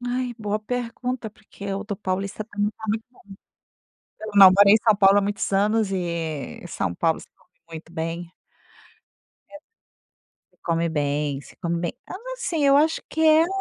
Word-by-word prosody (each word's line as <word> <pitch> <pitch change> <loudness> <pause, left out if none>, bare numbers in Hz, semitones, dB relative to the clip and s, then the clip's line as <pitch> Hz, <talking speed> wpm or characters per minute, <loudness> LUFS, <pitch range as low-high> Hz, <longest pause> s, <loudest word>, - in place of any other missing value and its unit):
Ai, 245 0 -2
boa 210 -1 -2
pergunta, 245 +1 -4
porque 200 -1 -9
o 195 +2 -4
do 205 -1 -4
paulista 195 +1 -3
também 205 -1 -1 0.2
é - - -6
muito 220 +1 -1
bom. 250 - -23 1.0
Eu, 215 - -6
não 195 -2 +10
morei 200 +1 +7
em - - +7
São 220 -2 +5
Paulo 195 0 +6
há - - +4
muitos 205 +2 -2
anos 210 +1 +2
e 165 - -4
São 85 - -2
Paulo 160 - 0
se - - -13
come - - -31 0.2
muito 165 +1 -9
bem. 165 +1 -4 1.2
É 295 - -12 1.0
Se - - -56
come 170 0 0
bem, 145 -2 -1
se - - -16
come 170 -1 -2
bem, 170 - -2
então, - - -7 0.2
assim, 345 -12 -2
eu 275 0 +6
acho 315 +2 +2
que 320 - -4
é 315 0 +6
a - - +1
205 Hz, 180 wpm, -24 LUFS, 170-230 Hz, 1.2 s, não